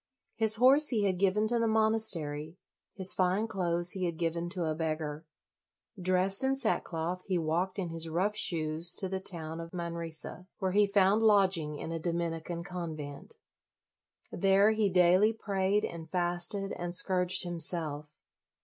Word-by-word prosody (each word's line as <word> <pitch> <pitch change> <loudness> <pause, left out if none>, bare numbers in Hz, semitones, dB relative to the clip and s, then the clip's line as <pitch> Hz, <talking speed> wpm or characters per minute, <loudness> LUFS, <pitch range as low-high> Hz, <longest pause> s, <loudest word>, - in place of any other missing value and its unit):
His 220 -1 +5
horse 270 +6 +5
he 220 -5 +1
had 185 -3 0
given 200 +2 +2
to 235 +1 0
the 230 - +1
monastery; 190 -9 0 0.4
his 190 -1 +1
fine 190 +4 0
clothes 175 -3 0
he 190 -2 -2
had 170 -2 -3
given 170 +1 -2
to 175 -1 -3
a 155 - -1
beggar. 155 -1 -4 0.7
Dressed 185 +4 +3
in 265 0 +1
sackcloth, 180 -8 -2
he 185 -2 0
walked 170 +4 -2
in 185 -4 -3
his 165 0 -3
rough 190 +6 -1
shoes 165 -3 0
to 190 - -2
the 190 0 -3
town 165 -4 0
of 165 0 -8
Manresa, 170 0 -5
where 190 -1 -2
he 205 +1 +3
found 200 +1 +3
lodging 190 -8 +2
in 160 - -6
a 165 - -3
Dominican 170 0 -3
convent. 160 -6 -7 1.0
There 195 +3 +3
he 215 -2 +1
daily 185 +4 +4
prayed 200 -1 -1
and 165 -1 -8
fasted 175 +3 0
and 175 0 -4
scourged 180 0 +1
himself. 160 -3 -2
180 Hz, 155 wpm, -30 LUFS, 165-195 Hz, 1.0 s, His